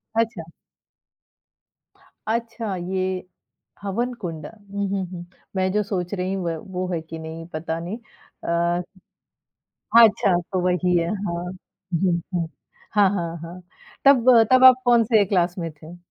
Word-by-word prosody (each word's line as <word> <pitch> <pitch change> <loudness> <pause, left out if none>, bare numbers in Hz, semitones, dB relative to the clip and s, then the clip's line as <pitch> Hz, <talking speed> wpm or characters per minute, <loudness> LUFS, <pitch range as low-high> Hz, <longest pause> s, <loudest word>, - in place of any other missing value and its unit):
अच्छा। 225 -8 -1 1.8
अच्छा, 225 -2 -2
ये 185 0 -2 0.5
हवन 235 +5 -2
कुंड। 165 -4 -5
हुँ, 200 -2 -5
हुँ, 195 -1 -1
हुँ। 175 -1 -7 0.3
मैं 185 0 +1
जो 210 +1 +1
सोच 180 -1 -2
रही 185 0 -2
हूँ, 190 -2 -3
व 165 -1 -1 0.2
वो 185 0 -1
है 165 - 0
कि 160 0 -9
नहीं 160 +1 -7
पता 160 +1 -3
नहीं। 180 +6 -5 0.5
अ 170 +1 +1 1.1
अच्छा, 215 -4 +6 0.2
तो 185 - 0
वही 180 0 +2
है, 170 0 +1
हाँ। 185 -4 -3 0.6
हुँ, 175 -2 +2
हुँ। 170 -2 0 0.5
हाँ, 200 -2 +6
हाँ, 170 -4 -3
हाँ। 175 +2 -9 0.4
तब 255 -3 +6 0.2
तब 255 0 +6
आप 255 0 +8
कौन-से 230 -3 +5
क्लास 180 -2 +1
में 165 -2 -3
थे? 155 +3 -13
185 Hz, 140 wpm, -23 LUFS, 170-210 Hz, 1.8 s, आप